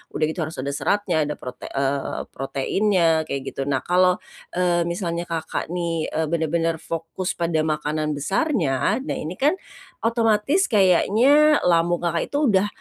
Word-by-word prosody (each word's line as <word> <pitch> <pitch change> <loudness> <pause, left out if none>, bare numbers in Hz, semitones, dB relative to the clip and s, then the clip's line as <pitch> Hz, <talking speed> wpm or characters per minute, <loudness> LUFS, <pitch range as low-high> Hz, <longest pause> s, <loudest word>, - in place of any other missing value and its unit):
udah 155 - 0
gitu 165 - -5
harus 160 - -8
ada 140 - -2
seratnya, 160 +2 0
ada 150 - -3
prote 125 -1 -8
eee, 140 0 -2
proteinnya 165 +4 +1
kayak 140 -1 -3
gitu. 135 0 -4
Nah, 130 -2 0
kalau, 180 0 +3 0.4
eee, 175 -1 +1
misalnya 170 -1 -3
Kakak 165 -1 -3
nih, 170 -2 -2
eee, 160 -1 0
bener-bener 165 0 0
fokus 165 +3 -4
pada 165 -2 0
makanan 155 -1 -1
besarnya, 195 - 0
nah - - -3
ini 165 +4 -5
kan 285 +7 +3 0.5
otomatis 230 - +1
kayaknya 235 - +5
lambung 170 0 +3
Kakak 170 -1 0
itu 285 - 0
udah 200 -1 +3
170 Hz, 150 wpm, -23 LUFS, 155-195 Hz, 0.5 s, kayaknya